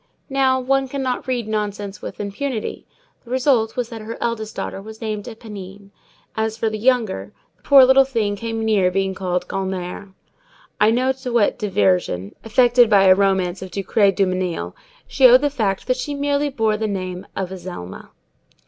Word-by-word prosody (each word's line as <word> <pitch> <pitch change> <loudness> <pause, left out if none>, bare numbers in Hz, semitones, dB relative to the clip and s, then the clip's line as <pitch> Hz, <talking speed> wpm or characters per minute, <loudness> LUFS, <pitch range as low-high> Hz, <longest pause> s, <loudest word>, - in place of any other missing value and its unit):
Now, 265 -1 +2
one 270 +1 +1
cannot 260 -2 -3
read 245 -4 -2
nonsense 210 -2 -3
with - - -8
impunity. 215 +4 -4 0.4
The 235 - -17
result 250 -3 +1
was 245 -2 -2
that 225 -2 -8
her 225 +2 -7
eldest 220 -2 -3
daughter 195 - -5
was 220 +2 -11
named 215 -2 -4
Éponine; 205 -4 -10 0.4
as 220 0 -2
for 225 -1 -1
the 215 - -4
younger, 215 - 0 0.2
the - - -37
poor 275 -2 +7
little 265 +1 +6
thing 225 -6 -1
came 225 +1 -4
near 205 -4 +3
being 190 +1 -1
called 180 -1 -2
Gulnare; 190 0 -4 0.7
I 210 - +5
know 250 +3 +1
not 265 - 0
to 260 -2 -5
what 235 -1 +2
diversion, 185 - 0
effected 240 +1 +4
by 200 -2 +5
a 190 -1 +7
romance 190 -2 +1
of 190 - -7
Ducray 200 +2 +2
Dumenil, 185 -3 -1 0.3
she 265 -2 +5
owed 250 +1 +7
the 290 -1 +1
fact 210 -8 -1
that 255 0 0
she 285 +3 -4
merely 285 +1 0
bore 225 -5 0
the 220 0 -2
name 185 -2 -5
of 190 -1 -3
Azelma. 175 - -8
215 Hz, 175 wpm, -21 LUFS, 195-250 Hz, 0.7 s, poor